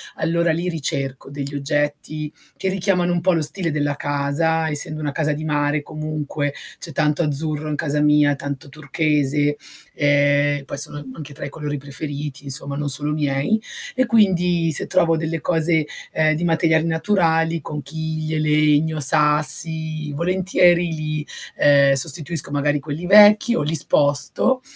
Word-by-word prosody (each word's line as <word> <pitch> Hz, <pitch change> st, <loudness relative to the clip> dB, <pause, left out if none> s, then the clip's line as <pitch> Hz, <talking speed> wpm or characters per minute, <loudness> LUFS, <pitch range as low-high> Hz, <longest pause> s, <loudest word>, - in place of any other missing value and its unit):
allora 170 Hz, +1 st, 0 dB
li 170 Hz, +3 st, -2 dB
ricerco 135 Hz, -5 st, -4 dB
degli 140 Hz, 0 st, -6 dB
oggetti 145 Hz, +1 st, -2 dB, 0.3 s
che 190 Hz, -, -1 dB
richiamano 185 Hz, -2 st, 0 dB
un 175 Hz, -, -1 dB
po' 185 Hz, +2 st, +2 dB
lo 165 Hz, -, +1 dB
stile 165 Hz, +2 st, -1 dB
della 145 Hz, -1 st, -1 dB
casa, 145 Hz, +3 st, -1 dB
essendo 155 Hz, +1 st, -1 dB
una 150 Hz, -2 st, -3 dB
casa 155 Hz, +1 st, -1 dB
di 155 Hz, +2 st, -5 dB
mare 145 Hz, 0 st, 0 dB
comunque, 155 Hz, -1 st, -4 dB, 0.3 s
c'è 165 Hz, -, -8 dB
tanto 150 Hz, +2 st, +1 dB
azzurro 150 Hz, +1 st, -2 dB
in 150 Hz, -, -2 dB
casa 150 Hz, 0 st, -1 dB
mia, 150 Hz, -1 st, +4 dB
tanto 140 Hz, -1 st, -6 dB
turchese. 145 Hz, 0 st, 0 dB, 0.4 s
Ehm 145 Hz, 0 st, +2 dB
poi 140 Hz, -, -6 dB
sono 145 Hz, 0 st, -4 dB
anche 145 Hz, +1 st, -9 dB
tra 140 Hz, -, -7 dB
i -, -, -5 dB
colori 145 Hz, 0 st, -5 dB
preferiti 145 Hz, 0 st, -6 dB
insomma, 140 Hz, +1 st, -4 dB
non 145 Hz, 0 st, -3 dB
solo 145 Hz, +2 st, 0 dB
miei, 145 Hz, +8 st, 0 dB, 0.3 s
e 260 Hz, -, +2 dB
quindi 180 Hz, -7 st, +2 dB
se 150 Hz, -, 0 dB
trovo 170 Hz, -3 st, +2 dB
delle 160 Hz, +1 st, -3 dB
cose 160 Hz, -2 st, +1 dB, 0.3 s
ehm 155 Hz, -1 st, +2 dB
di 170 Hz, -, -3 dB
materiali 160 Hz, -1 st, +2 dB
naturali: 165 Hz, -1 st, +1 dB
conchiglie, 155 Hz, +2 st, -4 dB
legno, 150 Hz, +1 st, +2 dB
sassi, 155 Hz, +1 st, +2 dB
volentieri 175 Hz, +1 st, +2 dB
li 155 Hz, -1 st, -4 dB, 0.3 s
ehm 140 Hz, -1 st, +5 dB
sostituisco 155 Hz, +2 st, 0 dB
magari 145 Hz, 0 st, 0 dB
quelli 150 Hz, +4 st, -6 dB
vecchi 210 Hz, +4 st, +6 dB
o -, -, 0 dB
li 150 Hz, +2 st, -1 dB
sposto 145 Hz, -, +2 dB
150 Hz, 150 wpm, -21 LUFS, 145-165 Hz, 0.4 s, vecchi